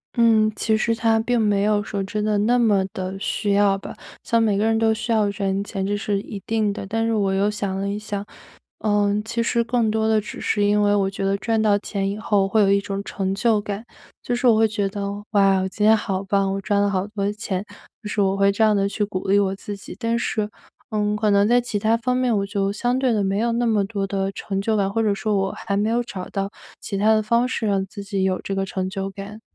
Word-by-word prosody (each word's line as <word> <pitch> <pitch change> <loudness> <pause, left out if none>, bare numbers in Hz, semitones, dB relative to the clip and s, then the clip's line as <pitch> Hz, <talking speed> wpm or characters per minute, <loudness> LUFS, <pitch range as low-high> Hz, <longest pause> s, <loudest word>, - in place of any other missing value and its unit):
嗯， 225 -2 +4
其 220 +1 +1
实 230 +1 +1
它 225 -1 +2
并 240 +2 +1
没 205 -2 +2
有 210 0 +2
说 205 -2 -3
真 210 +2 -3
的 210 -1 +1
那 235 +4 +3
么 210 -5 +3
地 185 0 -4
需 205 0 -1
要 200 -1 +3
吧。 195 - -9 0.3
像 230 0 +2
每 210 -3 +2
个 210 - +1
人 225 0 +2
都 225 -1 +3
需 220 +2 -4
要 215 -2 +3
赚 195 -1 -1
钱， 195 -2 -4
这 205 +1 0
是 205 -1 -1
一 205 - -7
定 215 -2 +1
的。 200 - -6
但 225 +2 -1
是 230 - 0
我 200 -3 +1
又 200 +2 +1
想 200 -2 -3
了 200 - -2
一 205 +1 -2
想， 205 -1 -5 0.5
嗯， 205 -1 +1
其 230 +1 -2
实 235 0 +1
更 230 -1 +1
多 220 0 +1
的 220 -1 +3
只 210 - -8
是 205 - +1
因 210 0 +3
为 205 0 +3
我 195 -1 +1
觉 195 0 -5
得 195 0 +1
赚 225 +1 0
到 210 -2 +3
钱 195 -1 -2
以 200 - -4
后 205 -3 +1
会 215 +2 +2
有 195 -1 +4
一 200 0 +3
种 200 0 -4
成 195 -1 -3
就 220 0 +2
感。 205 +1 -5 0.4
就 245 - -1
是 245 +1 +1
我 230 - +6
会 220 0 +4
觉 205 -2 -1
得： 200 +1 -5 0.3
“哇， 195 -2 +4
我 190 - -1
今 210 +2 -1
天 220 +1 +7
好 195 -3 -2
棒， 195 0 +1
我 195 - -3
赚 200 +1 +1
了 205 - +2
好 190 -1 -1
多 205 -1 -2
钱！” 200 -3 -3 0.4
就 210 - -7
是 210 - -3
我 195 -1 +2
会 200 0 +3
这 205 +3 +1
样 215 -1 +4
地 200 0 +2
去 205 +1 -2
鼓 195 -2 -5
励 200 +1 +4
我 195 -1 +2
自 205 +1 -7
己。 195 - -10
但 230 -1 0
是， 215 -3 -1 0.4
嗯， 210 -1 0
可 210 0 +1
能 200 0 +4
在 245 +2 +4
其 240 -3 -3
他 220 +2 +2
方 250 +2 0
面 250 -3 +1
我 200 - +1
就 200 -1 -1
相 245 +4 0
对 260 -2 +2
地 210 -2 +1
没 195 +1 0
有 235 +2 +1
那 235 +1 0
么 215 -3 +2
多 200 -1 -3
的 195 0 -1
成 195 0 -4
就 220 +2 0
感， 195 -2 +1
或 225 +2 0
者 210 -2 +2
说 210 +1 -1
我 195 0 0
还 200 - -3
没 210 +2 +1
有 240 +1 +2
找 195 -6 -7
到 195 -1 -2 0.3
其 200 - -4
他 215 +2 +4
的 215 - +3
方 235 +3 +2
式 235 -3 -2
让 195 -1 +1
自 200 +1 -9
己 200 -1 -2
有 190 -1 0
这 195 - -4
个 195 0 -1
成 190 -1 -3
就 195 0 -4
感。 200 +3 -9
205 Hz, 285 characters per minute, -22 LUFS, 195-220 Hz, 0.5 s, 天